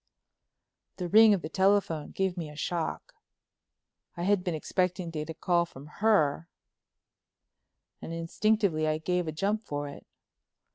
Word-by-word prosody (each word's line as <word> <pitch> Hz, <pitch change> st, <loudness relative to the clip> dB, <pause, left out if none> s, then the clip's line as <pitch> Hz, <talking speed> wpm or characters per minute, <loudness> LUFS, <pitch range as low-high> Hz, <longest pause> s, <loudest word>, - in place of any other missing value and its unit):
"The 180 Hz, -, -3 dB
ring 220 Hz, +3 st, +8 dB
of 180 Hz, -, -6 dB
the -, -, -3 dB
telephone 190 Hz, -4 st, +1 dB
gave 190 Hz, -2 st, -1 dB
me 165 Hz, -4 st, -5 dB
a 150 Hz, -, -11 dB
shock. 165 Hz, +2 st, -3 dB, 1.0 s
I 170 Hz, -, -3 dB
had 200 Hz, 0 st, +2 dB
been 175 Hz, -3 st, -1 dB
expecting 180 Hz, +2 st, -1 dB
to 160 Hz, -, -4 dB
get 150 Hz, +1 st, -5 dB
a 160 Hz, -, -5 dB
call 175 Hz, +1 st, +2 dB
from 135 Hz, -3 st, -12 dB, 0.2 s
her 170 Hz, -7 st, +2 dB, 1.5 s
and -, -, -7 dB
instinctively 165 Hz, 0 st, +1 dB
I 155 Hz, 0 st, +1 dB
gave 180 Hz, +2 st, -1 dB
a -, -, -1 dB
jump 200 Hz, +7 st, -1 dB
for 145 Hz, -6 st, -4 dB
it. 140 Hz, -, -11 dB
175 Hz, 150 wpm, -29 LUFS, 155-195 Hz, 1.5 s, ring